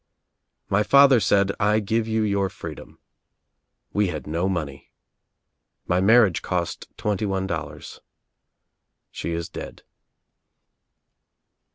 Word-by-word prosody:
My 100 +1 +2
father 140 +2 +6
said, 100 -1 +2
'I 105 +1 +2
give 110 +2 -1
you 110 0 0
your 100 -2 0
freedom.' - - -10 1.0
We 105 -1 +2
had 75 -6 -5
no 85 +5 -1
money. 75 -7 -4 1.0
My 90 +1 +1
marriage 105 -3 +4
cost 85 -2 -3
twenty 105 0 -1
one 95 -1 -1
dol 80 -5 -3
lars. - - -12 1.1
She 85 - -4
is 85 0 -3
dead." - - -9
100 Hz, 110 wpm, -23 LUFS, 85-105 Hz, 1.1 s, father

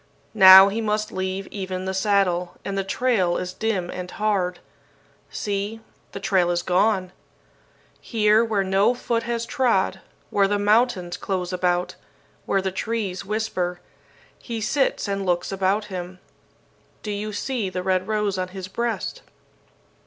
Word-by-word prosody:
Now 190 0 +10
he 220 +3 -2
must 215 0 -1
leave 190 0 -3
even 185 -2 -4
the 190 - -2
saddle, 190 -3 +1
and 195 - -3
the 195 - 0
trail 195 -4 +1
is 180 0 -4
dim 195 -6 -2
and 180 0 -6
hard. 195 -5 -1 0.7
See, 205 +2 -3 0.3
the - - -6
trail 190 -3 +2
is 175 0 0
gone! 185 0 +1 0.9
Here, 215 -1 +3
where 215 -4 0
no 195 +5 +2
foot 235 -1 -1
has 235 -1 -1
trod, 230 -9 +1 0.3
where 200 -1 +3
the 205 +1 0
mountains 205 -4 +2
close 185 -2 -3
about, 180 0 0 0.5
where 195 -1 +1
the 190 - -1
trees 195 -1 -3
whisper, 190 -4 -2 0.6
he 230 -2 -5
sits 270 +2 0
and 200 0 -2
looks 175 -1 -1
about 195 +2 0
him. 180 0 -6 0.9
Do 210 - -4
you 210 +1 -4
see 215 0 -2
the 185 0 -4
red 185 0 0
rose 210 -3 -1
on 185 - -1
his 185 0 -8
breast? 235 +4 -3
195 Hz, 145 wpm, -23 LUFS, 185-215 Hz, 0.9 s, Now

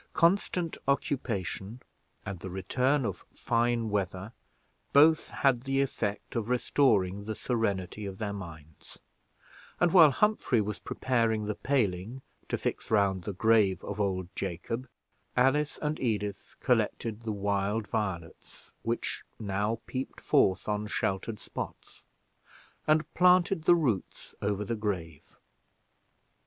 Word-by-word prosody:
Constant 175 -1 +2
occupation, 115 -6 -1 0.5
and 100 -4 -5
the 95 - -6
return 125 +9 +1
of 100 -5 -4
fine 120 -1 +1
weather, 95 0 -2 0.6
both 155 +2 +6
had 135 -4 +2
the 135 +1 0
effect 115 -7 -2
of 115 -1 -2
returning 105 -6 +2
the 110 0 -3
serenity 105 -4 -2
of 95 -1 -7
their 105 -1 -3
minds; 80 -6 -10 0.8
and 175 -1 +3
while 165 -5 +9
Humphrey 145 - +2
was 105 0 -2
preparing 115 -4 0
the 105 - -1
paling 115 -1 -1 0.3
to - - 0
fix - - -3
round 100 -4 +2
the 105 - -3
grave 100 -2 +3
of 105 +1 -3
old 95 -3 -1
Jacob, 100 +7 -4 0.5
Alice 145 +4 +3
and 150 +1 -1
Edith 105 -5 -2
collected 110 -1 0
the 115 -1 -3
wild 100 +1 0
violets 95 -7 -5
which 115 +1 -2 0.2
now 105 +2 -1
peeped 130 +1 -5
forth 95 0 +2
on 105 0 -1
sheltered 105 +1 -2
spots, - - -8 0.9
and 155 0 +2
planted 180 -1 +4
the 175 - +7
roots 125 - -2
over 100 0 -1
the 115 - -2
grave. 90 -8 -4
110 Hz, 125 wpm, -29 LUFS, 100-130 Hz, 0.9 s, while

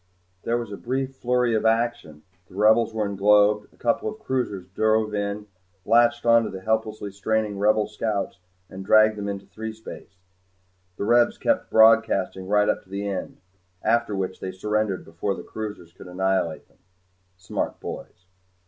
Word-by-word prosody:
There 115 +1 +1
was 120 -3 -5
a 100 - -6
brief 130 +2 -3
flurry 125 -1 +1
of 110 - +1
action, 110 -10 0 0.2
the - - -17
Rebels 110 +3 +4
were 110 -2 -1
englobed, 105 +1 +3
a - - -25
couple 120 - 0
of 215 - -8
cruisers 125 - -3
drove 110 +2 +1
in, 100 0 -3 0.4
latched 120 +2 +3
onto 115 -1 +4
the 95 -1 -8
helplessly 110 -1 -2
straining 105 0 -1
Rebel 105 +1 +3
scouts 105 -2 -3 0.3
and 95 0 -9
dragged 110 +2 +5
them 100 -1 -4
into 100 0 -5
threespace. 110 -2 -9 0.8
The - - -3
Rebs 120 +2 +3
kept - - 0
broadcasting 110 -4 +4
right 105 +1 +3
up - - +1
to - - -27
the 100 +1 -4
end 95 -2 -5 0.4
after 115 -3 +1
which 95 -1 -3
they 95 - -5
surrendered 105 +1 -2
before 85 +5 -3
the - - -8
cruisers 105 -6 -7
could 95 - -13
annihilate 95 -2 -1
them. - - -32 0.6
Smart 95 0 -4
boys. 90 - -9
105 Hz, 160 wpm, -24 LUFS, 100-110 Hz, 0.8 s, dragged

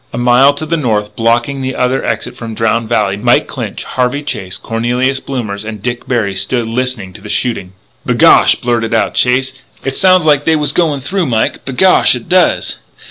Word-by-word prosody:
A - - -6
mile 125 +3 +4
to 155 - -5
the 165 +2 -1
north, 105 -7 -1
blocking 120 +4 0
the 130 0 -3
other 125 +1 0
exit 115 -2 -3
from 115 -2 -7
Drowned 115 0 0
Valley, 105 -4 0
Mike 105 - +2
Clinch, - - -6
Harvey 130 +3 -2
Chase, 95 -9 -4
Cornelius 125 +5 -1
Blommers, 110 -8 -5
and 110 -1 -7
Dick 120 +3 -4
Berry 110 -6 0
stood 105 +5 -2
listening 115 -4 -3
to 110 - -13
the 105 - -10
shooting. 110 -7 -1 0.3
"B'gosh," - - +5
blurted 115 -2 -1
out 110 - 0
Chase, 130 +1 +1 0.3
"it 135 0 -2
sounds 185 -3 +4
like 145 -2 +3
they 160 - +3
was 150 -2 +1
goin' 155 -6 0
through, 180 +4 -2
Mike. 115 -3 -1
B'gosh, 135 +3 +3
it 120 - -8
does!" 180 0 +1
120 Hz, 190 wpm, -13 LUFS, 110-135 Hz, 0.3 s, B'gosh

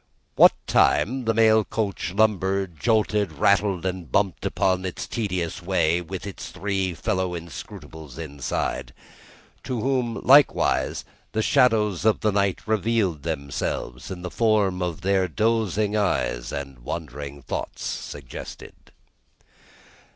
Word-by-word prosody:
What - - +8
time, 130 +3 +2
the 115 - +2
mail 110 -1 +5
coach 100 -4 -3
lumbered, 95 -4 +1
jolted, 105 -5 +1
rattled, 95 +2 +2
and 90 -6 -4
bumped 95 +1 +1
upon 95 -1 +1
its 95 -2 -4
tedious 95 -8 -3
way, 85 -2 +1
with 90 +3 -7
its 100 - -7
three 95 -2 -2
fellow 95 +1 -1
inscrutables 80 - -9
inside. 70 -4 -3 0.7
To 125 -3 -2
whom, 125 -1 0
likewise, 140 +2 +4 0.3
the 110 - 0
shadows 110 - +3
of 110 -1 +3
the 105 - +2
night 100 -2 +1
revealed 110 -7 0
themselves, 70 -4 -4
in 90 -2 -7
the 90 - -5
forms 95 -6 +1
their 95 0 +2
dozing 110 +1 0
eyes - - 0
and 70 -3 -6
wandering 70 0 -6
thoughts - - -5
suggested. 70 -4 -7
95 Hz, 120 wpm, -24 LUFS, 80-110 Hz, 0.7 s, What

